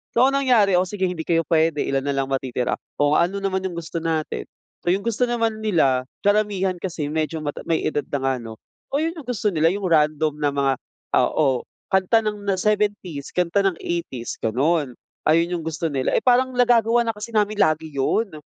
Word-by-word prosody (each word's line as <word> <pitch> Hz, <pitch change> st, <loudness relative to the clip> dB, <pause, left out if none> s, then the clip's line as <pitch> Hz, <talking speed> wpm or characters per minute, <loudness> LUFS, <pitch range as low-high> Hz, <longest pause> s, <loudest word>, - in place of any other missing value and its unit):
So, 235 Hz, -, +5 dB
ang 270 Hz, -, +2 dB
nangyari, 235 Hz, -8 st, +4 dB
o 185 Hz, -, +1 dB
sige, 190 Hz, 0 st, -4 dB
hindi 175 Hz, -3 st, -4 dB
kayo 165 Hz, -1 st, +2 dB
puwede, 160 Hz, -1 st, +2 dB
ilan 135 Hz, 0 st, 0 dB
na 140 Hz, -, 0 dB
lang 135 Hz, 0 st, 0 dB
matitira? 130 Hz, -2 st, -1 dB, 0.2 s
O 145 Hz, 0 st, +3 dB
ano 180 Hz, +4 st, +1 dB
naman 190 Hz, -1 st, 0 dB
yung 180 Hz, -2 st, -3 dB
gusto 165 Hz, 0 st, -4 dB
natin? 155 Hz, -, -2 dB, 0.4 s
So, -, -, -17 dB
yung 190 Hz, +3 st, +1 dB
gusto 235 Hz, +2 st, 0 dB
naman 230 Hz, -2 st, -1 dB
nila, 140 Hz, -12 st, +2 dB, 0.2 s
karamihan 205 Hz, -2 st, +2 dB
kasi 165 Hz, -5 st, -4 dB
medyo 155 Hz, 0 st, -2 dB
mata 145 Hz, -1 st, -4 dB
may 165 Hz, -1 st, +1 dB
edad 145 Hz, -1 st, -1 dB
na 145 Hz, -, -1 dB
nga 135 Hz, -, +2 dB
ano. 115 Hz, -1 st, -8 dB, 0.4 s
Oo, -, -, +4 dB
yun 325 Hz, -, 0 dB
yung 310 Hz, -7 st, -11 dB
gusto 220 Hz, -4 st, 0 dB
nila, 160 Hz, -2 st, +2 dB
yung 200 Hz, +3 st, -3 dB
random 155 Hz, -2 st, +2 dB
na 145 Hz, -1 st, +2 dB
mga 140 Hz, -1 st, +2 dB, 0.5 s
oo, 135 Hz, -5 st, +2 dB, 0.3 s
kanta 190 Hz, +4 st, +3 dB
ng 210 Hz, -1 st, -3 dB
na 195 Hz, -, +2 dB
'70s, 205 Hz, -7 st, -1 dB
kanta 180 Hz, +2 st, +1 dB
ng 195 Hz, -2 st, +1 dB
'80s, 165 Hz, -9 st, -4 dB
gano'n. 135 Hz, +3 st, 0 dB, 0.3 s
Ayun 170 Hz, +3 st, +2 dB
yung 160 Hz, -, -8 dB
gusto 160 Hz, 0 st, -2 dB
nila. 135 Hz, -2 st, 0 dB
Eh, -, -, +1 dB
parang 255 Hz, +1 st, +3 dB
nagagawa 240 Hz, -1 st, +4 dB
na 225 Hz, -, +1 dB
kasi 210 Hz, +1 st, -8 dB
namin 210 Hz, 0 st, +1 dB
lagi 155 Hz, -3 st, +2 dB
'yon. 165 Hz, +10 st, 0 dB
170 Hz, 200 wpm, -22 LUFS, 150-210 Hz, 0.5 s, So